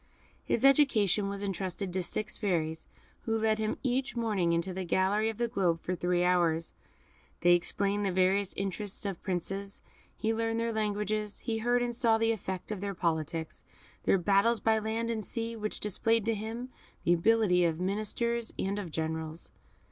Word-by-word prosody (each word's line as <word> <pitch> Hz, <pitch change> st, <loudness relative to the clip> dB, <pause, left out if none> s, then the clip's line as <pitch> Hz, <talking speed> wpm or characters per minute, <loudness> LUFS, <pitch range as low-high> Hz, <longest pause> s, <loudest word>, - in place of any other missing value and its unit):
His 235 Hz, -, +1 dB
education 220 Hz, -, +4 dB
was 200 Hz, 0 st, -4 dB
entrusted 190 Hz, -1 st, -3 dB
to 185 Hz, -, 0 dB
six 210 Hz, +4 st, -3 dB
fairies, 160 Hz, -6 st, -1 dB, 0.4 s
who 225 Hz, -1 st, +1 dB
led 220 Hz, 0 st, +1 dB
him 215 Hz, 0 st, -1 dB
each 260 Hz, 0 st, 0 dB
morning 210 Hz, -7 st, +1 dB
into 170 Hz, +3 st, 0 dB
the 190 Hz, +1 st, -3 dB
gallery 195 Hz, +5 st, +2 dB
of 220 Hz, -, -5 dB
the 240 Hz, -, +1 dB
globe 185 Hz, -7 st, +1 dB
for 180 Hz, -, -3 dB
three 175 Hz, 0 st, +1 dB
hours; 170 Hz, -2 st, +2 dB, 0.7 s
they 175 Hz, 0 st, +6 dB
explained 200 Hz, +3 st, 0 dB
the 195 Hz, -, +1 dB
various 190 Hz, +2 st, +2 dB
interests 195 Hz, +1 st, -3 dB
of 195 Hz, -4 st, -3 dB
Princes, 195 Hz, +2 st, -3 dB, 0.4 s
he 225 Hz, 0 st, 0 dB
learned 225 Hz, 0 st, -1 dB
their 230 Hz, 0 st, -1 dB
languages, 210 Hz, 0 st, -1 dB
he 225 Hz, -2 st, -2 dB
heard 245 Hz, +2 st, +2 dB
and 240 Hz, -1 st, -2 dB
saw 230 Hz, -2 st, +3 dB
the 225 Hz, 0 st, +2 dB
effect 190 Hz, -3 st, -4 dB
of 205 Hz, -3 st, -4 dB
their 200 Hz, -1 st, -3 dB
politics, 160 Hz, -1 st, -2 dB, 0.4 s
their -, -, +4 dB
battles 200 Hz, +5 st, +3 dB
by 220 Hz, -1 st, +3 dB
land 225 Hz, +2 st, -2 dB
and 220 Hz, -2 st, -2 dB
sea, 230 Hz, +3 st, -3 dB
which 215 Hz, -1 st, -3 dB
displayed 220 Hz, +2 st, +1 dB
to 225 Hz, -, +2 dB
him 225 Hz, +4 st, -5 dB, 0.3 s
the 175 Hz, -, +4 dB
ability 180 Hz, 0 st, +3 dB
of 165 Hz, -1 st, +1 dB
ministers 215 Hz, +5 st, -1 dB
and 200 Hz, +2 st, -1 dB
of 190 Hz, -4 st, -5 dB
generals. 160 Hz, +1 st, -4 dB
205 Hz, 175 wpm, -30 LUFS, 180-225 Hz, 0.7 s, they